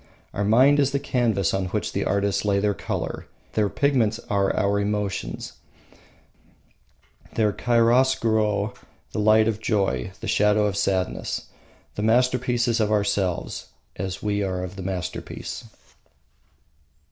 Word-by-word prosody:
Our 100 - -1
mind 130 +8 +5
is 140 -1 +2
the 140 - +1
canvas 120 - 0
on 95 -1 0
which - - -3
the - - -1
artists 100 0 0
lay 100 -1 +2
their 100 +1 +1
colour; - - -4 0.3
their 105 -2 +1
pigments 120 -6 +1
are 100 -1 +2
our 100 0 +2
emotions; 100 -1 -3 1.8
their 105 -2 +2
chiaroscuro 115 -4 +2 0.4
the - - -3
light 110 +1 +5
of 110 -2 -1
joy, 95 - 0
the - - -6
shadow 105 0 +3
of 100 -2 -1
sadness. 95 -2 -1 0.4
The - - -4
masterpiece 125 +2 +2
is 115 0 +1
of 105 -1 +1
ourselves, 100 -4 -1 0.3
as 95 +1 -5
we 105 -1 0
are 95 -2 -2
of 90 +1 -6
the 95 - -7
masterpiece. 90 -5 -5
105 Hz, 135 wpm, -24 LUFS, 100-115 Hz, 1.8 s, mind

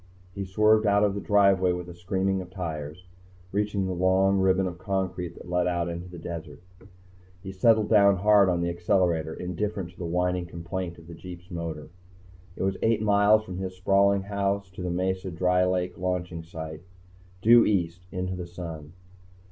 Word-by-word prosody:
He 100 0 -4
swerved 105 +3 +3
out 100 0 +4
of 100 -1 +2
the 100 - -4
driveway 100 -3 +3
with 90 0 -5
a 90 - -9
screaming 95 +2 -1
of 90 - -10
tires. 80 -2 -6 0.5
Reaching 105 -1 -1
the 95 - -2
long 95 +2 +3
ribbon 95 0 +3
of 90 -1 -5
concrete 95 -4 -3
that - - -12
led 90 0 +1
out 85 -1 -1
into 85 +1 -6
the 90 - -10
desert, 80 -3 -7 0.8
he 95 - -6
settled 110 +2 +3
down 100 -2 +6
hard 100 0 +5
on 85 -1 0
the 85 - 0
accelerator, 85 -2 0
indifferent 90 0 -4
to 90 - -24
the 90 - -4
whining 90 +1 0
complaint 85 +1 -5
of 85 - -15
the 85 - -10
jeep's 90 +2 -11
motor. 80 -3 -5 0.7
It - - -4
was 95 0 0
eight 110 -1 +2
miles 105 +1 +4
from 95 -3 -7
his 95 -1 -5
sprawling 100 +1 +3
house 100 -1 -2
to 95 - -9
the 90 - -2
Mesa 95 +1 -1
Dry 90 +1 +2
Lake 90 -1 -1
launching 90 -2 -2
site, 80 -1 -8 0.6
due 120 +1 +7
east, 90 -3 -1
into 90 0 -3
the 90 -1 -6
sun. 85 -3 -8
90 Hz, 180 wpm, -26 LUFS, 85-100 Hz, 0.8 s, due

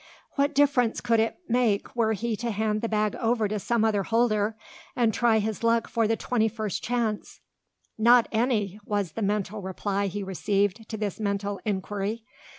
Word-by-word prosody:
What 285 +1 0
difference 275 -5 +3
could 230 -1 +2
it 225 +1 0
make 235 -4 +1
were 225 -2 +2
he 225 +2 -2
to 235 +2 -3
hand 215 0 -1
the 230 - -2
bag 215 -1 0
over 225 -2 +1
to 210 +1 -2
some 230 +2 +1
other 210 -2 +2
holder, 220 -1 +1 0.4
and 235 -3 +2
try 235 0 +3
his 215 -1 -2
luck 230 0 +2
for 230 -2 +1
the 225 - +2
twenty 225 -1 0
first 220 -3 -3
chance? 230 -3 -2 0.6
"Not 235 +1 +6
any!" 220 -4 0
was 205 -4 -1
the 225 - -5
mental 210 0 -1
reply 200 +1 -2
he 200 +2 -4
received 200 +3 -1
to 220 - -4
this 210 -2 -3
mental 200 -1 -2
inquiry. 205 +2 -2
220 Hz, 175 wpm, -26 LUFS, 205-230 Hz, 0.6 s, Not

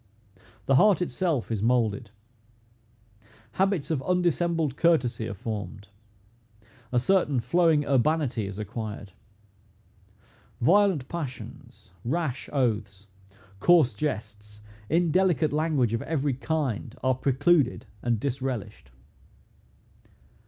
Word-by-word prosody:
The 135 - +4
heart 200 +1 +5
itself 170 -8 -1
is 110 -3 -1
moulded. 115 -1 +1 1.4
Habits 190 -5 0
of 150 -4 0
undissembled 170 -4 0
courtesy 130 -9 +1
are 105 - -5
formed. 100 -2 -6 1.0
A 125 - +3
certain 150 -3 +2
flowing 155 +4 +2
urbanity 135 -5 +1
is 100 0 -7
acquired. 105 -2 -6 1.5
Violent 180 - +3
passions, 145 -6 -8
rash 135 0 -2
oaths, 105 -7 -1 0.5
coarse 160 -4 +5
jests, 105 -4 -5 0.3
indelicate 170 -1 +2
language 150 -7 +1
of 115 - -1
every 145 -3 -1
kind, 135 -4 -3
are 130 0 +3
precluded 135 +2 +1 0.2
and 120 -3 0
disrelished. 125 - -4
135 Hz, 95 wpm, -26 LUFS, 115-165 Hz, 1.5 s, heart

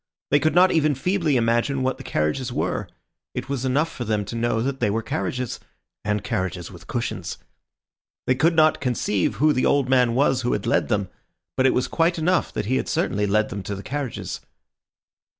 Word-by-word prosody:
They 145 - +5
could 155 +3 +1
not 185 +1 +6
even 155 -3 +2
feebly 165 0 +1
imagine 120 +3 +1
what 130 0 -1
the - - -8
carriages 75 - -1
were; - - -2 0.5
it - - -4
was 135 -2 -2
enough 145 +6 +1
for 125 - -5
them 105 -2 -1
to 110 - -6
know 115 -1 0
that 135 +1 -2
they - - +2
were 110 +2 -1
carriages, 115 +3 -3 0.4
and 105 -1 -1
carriages 95 -4 -3
with 85 -2 -13
cushions. 120 -1 -3 0.9
They 130 - +3
could 160 +6 +2
not 155 -1 +4
conceive 115 -7 0
who 150 +1 +3
the 130 - +2
old 140 -3 +2
man 125 -3 +3
was 130 -1 +3
who 120 - 0
had - - -2
led 115 - +2
them; 100 -4 0 0.5
but 130 - +4
it - - +2
was 125 - +1
quite 170 +1 +1
enough 175 +3 +1
that - - -2
he 130 +5 +1
had - - -2
certainly 105 +1 0
led 110 +2 +2
them 100 - -5
to 100 +1 -4
the 100 - -8
carriages. 140 +1 -4
125 Hz, 205 wpm, -23 LUFS, 105-140 Hz, 0.9 s, not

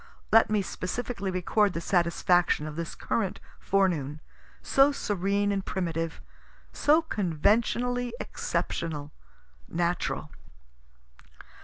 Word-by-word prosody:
Let 225 - +6
me 210 -2 +2
specially 200 +2 -4
record 190 +2 +1
the - - -2
satisfaction 175 -2 +2
of 155 -1 -6
this 170 0 -5
current 200 -5 -2 0.2
forenoon, 165 -7 +1 0.4
so 275 +1 +5
serene 205 -4 0
and 195 -1 -1
primitive, 165 -3 -3 0.5
so 310 +3 +4
conventionally 235 - +1
exceptional, 150 -3 -3 0.6
natural. 175 +1 -1
190 Hz, 95 wpm, -28 LUFS, 170-215 Hz, 0.6 s, Let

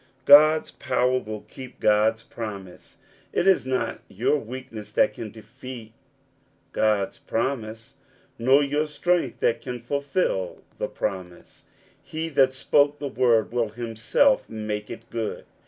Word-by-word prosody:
God's 155 +2 +7
power 125 +1 +1
will 110 -3 -7
keep 130 -1 -12
God's 110 +1 +3
promise. 100 -5 -8 0.3
It - - 0
is 190 -9 +4
not 130 -3 -1
your 115 +9 0
weakness 115 -4 -8
that 105 - +3
can 110 0 -7
defeat 115 +1 -11 0.8
God's 105 -3 0
promise, 115 +1 -3 0.4
nor 135 +5 +5
your 145 +2 0
strength 160 -3 0
that 115 - +1
can 125 -1 -5
fulfil 140 - -2 0.2
the - - -1
promise: 90 -4 -6 0.4
he 160 +1 -5
that 135 -3 +3
spoke 145 +2 +3
the 145 - -4
word 120 -3 +2
will 120 -2 0
himself 115 - +1
make 105 -1 -4
it 115 0 -9
good. 115 -2 -4
120 Hz, 130 wpm, -25 LUFS, 110-140 Hz, 0.8 s, God's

